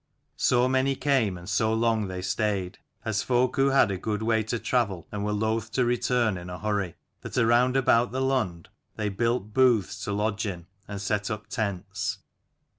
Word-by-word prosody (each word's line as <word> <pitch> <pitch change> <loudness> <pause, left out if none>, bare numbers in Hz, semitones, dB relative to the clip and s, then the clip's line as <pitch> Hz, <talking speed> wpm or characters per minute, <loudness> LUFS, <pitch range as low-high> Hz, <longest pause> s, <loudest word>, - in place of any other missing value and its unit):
So 125 0 +3
many 130 +1 +2
came 130 -10 +1
and 90 0 -11
so 110 -1 +1
long 110 -2 +1
they 90 -1 -5
stayed, 95 -1 -1 0.3
as 110 -1 0
folk 125 0 +1
who 135 0 +4
had 135 -6 +4
a 95 - -3
good 105 +1 -2
way 110 0 +2
to 110 +2 -2
travel 105 -9 -1
and 105 -1 -3
were 105 - -1
loth 110 +1 -1
to 125 - +2
return 120 -4 +1
in 90 +1 -9
a 90 - -6
hurry, 100 -4 -2 0.3
that - - -6
around 125 +2 +4
about 120 -2 +3
the 130 - -2
Lund 125 -11 -1 0.3
they 105 -1 -1
built 110 0 -1
booths 110 -6 +2
to - - -2
lodge 105 +1 -1
in, 85 -4 -5 0.2
and 100 -1 -5
set 100 +1 -1
up 110 -1 -4
tents. 100 -5 -3
110 Hz, 190 wpm, -27 LUFS, 100-120 Hz, 0.3 s, who